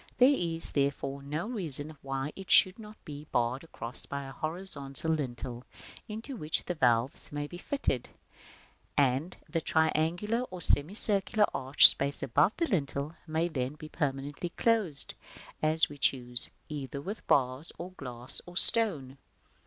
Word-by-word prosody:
There 255 Hz, +3 st, +5 dB
is, 165 Hz, -6 st, -2 dB
therefore, 140 Hz, -1 st, -2 dB
no 150 Hz, +6 st, -5 dB
reason 155 Hz, -, -2 dB
why 135 Hz, +2 st, -5 dB
it 195 Hz, -1 st, -11 dB
should 185 Hz, +3 st, +5 dB
not 215 Hz, 0 st, -12 dB
be 150 Hz, 0 st, -9 dB
barred 120 Hz, +3 st, -1 dB
across 125 Hz, -6 st, -6 dB
by 140 Hz, 0 st, -5 dB
a 135 Hz, -, -9 dB
horizontal 155 Hz, -2 st, -5 dB
lintel, 125 Hz, -5 st, -5 dB, 0.5 s
into 225 Hz, +6 st, -7 dB
which 155 Hz, -8 st, -2 dB
the 180 Hz, -, -3 dB
valves 125 Hz, -4 st, 0 dB
may 145 Hz, 0 st, -4 dB
be 175 Hz, +4 st, -10 dB
fitted, 185 Hz, -, -2 dB, 0.9 s
and 140 Hz, +5 st, 0 dB
the 165 Hz, +1 st, -3 dB
triangular 165 Hz, +9 st, 0 dB
or 185 Hz, -, -9 dB
semicircular 200 Hz, +6 st, +4 dB
arched 135 Hz, +2 st, +6 dB
space 140 Hz, 0 st, -4 dB
above 145 Hz, -, +1 dB
the 335 Hz, -, 0 dB
lintel 150 Hz, -, -3 dB
may 160 Hz, +2 st, -1 dB
then 135 Hz, -4 st, -4 dB
be 155 Hz, 0 st, -11 dB
permanently 145 Hz, +2 st, -4 dB
closed, 205 Hz, -7 st, +2 dB, 0.5 s
as 155 Hz, +1 st, +5 dB
we 145 Hz, -1 st, -13 dB
choose, 125 Hz, -2 st, +4 dB, 0.2 s
either 140 Hz, -2 st, -7 dB
with 200 Hz, +10 st, -8 dB
bars, 130 Hz, +3 st, +1 dB
or 175 Hz, +2 st, -8 dB
glass, 125 Hz, -7 st, -7 dB
or 175 Hz, 0 st, -9 dB
stone. 150 Hz, -, +6 dB
150 Hz, 145 wpm, -29 LUFS, 135-180 Hz, 0.9 s, arched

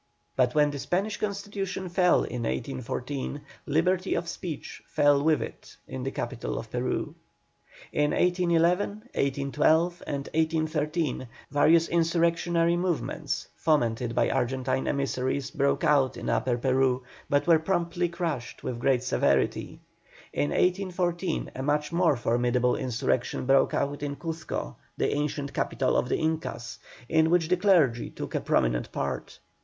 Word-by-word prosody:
But 125 Hz, 0 st, +2 dB
when 150 Hz, -1 st, +4 dB
the 140 Hz, -, -5 dB
Spanish 195 Hz, +8 st, -1 dB
Constitution 200 Hz, -2 st, -3 dB
fell 180 Hz, 0 st, +3 dB
in 125 Hz, -, -4 dB
1814, 130 Hz, +3 st, -3 dB, 0.3 s
liberty 180 Hz, +5 st, +1 dB
of 170 Hz, -, -2 dB
speech 170 Hz, -2 st, -6 dB
fell 145 Hz, -1 st, +3 dB
with 155 Hz, -1 st, +3 dB
it -, -, -10 dB
in 65 Hz, -, -6 dB
the -, -, -2 dB
capital -, -, -4 dB
of -, -, -7 dB
Peru. -, -, -2 dB, 0.8 s
In 150 Hz, 0 st, +2 dB
1811, 175 Hz, +1 st, +2 dB, 0.2 s
1812, 150 Hz, +5 st, +1 dB
and 140 Hz, -1 st, -3 dB
1813, 155 Hz, -3 st, 0 dB, 0.2 s
various 160 Hz, +3 st, +4 dB
insurrectionary 170 Hz, 0 st, +2 dB
movements, 175 Hz, -3 st, -2 dB
fomented 120 Hz, -6 st, +1 dB
by -, -, +2 dB
Argentine 130 Hz, +1 st, 0 dB
emissaries, 135 Hz, -1 st, -1 dB
broke 140 Hz, 0 st, +1 dB
out 140 Hz, -3 st, +3 dB
in -, -, -4 dB
Upper 125 Hz, -2 st, +1 dB
Peru, 130 Hz, 0 st, +2 dB, 0.3 s
but 145 Hz, -1 st, +2 dB
were 165 Hz, -2 st, +5 dB
promptly 175 Hz, 0 st, 0 dB
crushed 165 Hz, -8 st, -4 dB
with 120 Hz, -2 st, -3 dB
great 130 Hz, -1 st, +2 dB
severity. 125 Hz, -, 0 dB, 0.5 s
In 75 Hz, 0 st, 0 dB
1814 180 Hz, -, 0 dB
a 130 Hz, -, -4 dB
much 150 Hz, +2 st, 0 dB
more 170 Hz, -3 st, +3 dB
formidable 120 Hz, +1 st, +1 dB
insurrection 125 Hz, 0 st, -1 dB
broke 135 Hz, +1 st, +4 dB
out 140 Hz, 0 st, -1 dB
in 145 Hz, -1 st, -3 dB
Cuzco, 165 Hz, 0 st, -5 dB, 0.2 s
the -, -, +1 dB
ancient 145 Hz, -1 st, -2 dB
capital 130 Hz, +1 st, 0 dB
of 125 Hz, -, +1 dB
the -, -, +1 dB
Incas, 155 Hz, -7 st, -3 dB, 0.3 s
in 160 Hz, +2 st, +3 dB
which 170 Hz, -1 st, +2 dB
the 180 Hz, -, +3 dB
clergy 165 Hz, -, +3 dB
took -, -, -7 dB
a -, -, 0 dB
prominent -, -, +1 dB
part. -, -, -4 dB
150 Hz, 140 wpm, -27 LUFS, 130-170 Hz, 0.8 s, were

